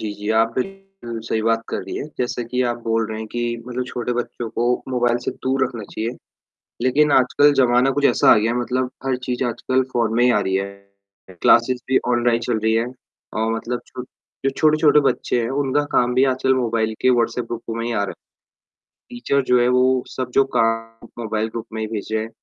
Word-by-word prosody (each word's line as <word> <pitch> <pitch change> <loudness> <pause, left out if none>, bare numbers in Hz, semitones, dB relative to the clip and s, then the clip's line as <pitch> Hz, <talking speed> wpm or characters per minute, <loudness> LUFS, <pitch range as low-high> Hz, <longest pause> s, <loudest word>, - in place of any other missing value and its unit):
जी, 110 - -3
जी, 105 +1 -7
आप 115 +1 +3
बिल्कुल 195 -6 -6
सही 110 - 0
बात 115 0 +1
कर - - -2
रही - - -6
हैं, - - -4
जैसे 120 0 -2
कि 125 0 0
आप 120 - -7
बोल 115 -1 0
रहे 110 0 -5
हैं 110 - -5
कि 120 - -4 0.3
मतलब 125 0 -3
छोटे 125 -1 -3
बच्चों 120 -1 -4
को 120 +2 -1 0.2
मोबाइल 120 -2 +1
से - - -1
दूर 130 +1 +1
रखना 115 -3 -5
चाहिए, 110 +3 -4 0.7
लेकिन 140 +3 +3
आजकल 145 +3 +4
ज़माना 125 +2 +3
कुछ 145 - +1
ऐसा - - +4
आ - - +6
गया 115 +2 +1
है, - - -2
मतलब 125 +1 -1
हर 130 -1 0
चीज़ 125 +1 -2
आजकल 130 +2 0
फोन 115 -2 0
में 120 - +3
ही 125 - +5
आ 105 - +3
रही 95 -1 -1
है। 95 +1 0 0.8
क्लासेस 125 +1 +4
भी 130 - +5
ऑनलाइन 120 -1 +2
चल 120 -3 0
रही 110 +1 +1
है 115 +1 +1 0.5
और 110 +1 0
मतलब 120 +2 -3
छो 125 - -8 0.4
जो 135 - +3
छोटे-छोटे 155 -1 +4
बच्चे 120 - -1
हैं 115 - -2 0.2
उनका 145 +2 +1
काम 125 0 +2
भी 130 +2 +4
आजकल 130 0 +1
मोबाइल 115 -3 0
के 130 - +4
व्हाट्सएप 120 0 +1
ग्रुप 115 0 -4
में 115 - -3
ही 120 - -2
आ 100 - 0
रहा - - -5
है, - - -8 1.0
टीचर 240 - 0
जो 125 0 +5
है 120 - +3
वो 125 0 +3
सब 130 -1 -4
जो 135 - +7
काम 115 0 -1 0.2
मोबाइल 110 0 -1
ग्रुप 115 0 -6
में 110 - -3
ही 110 - -2
भेज 105 -2 -5
रहे 110 0 0
हैं 115 - -8
120 Hz, 220 wpm, -21 LUFS, 115-130 Hz, 1.0 s, जो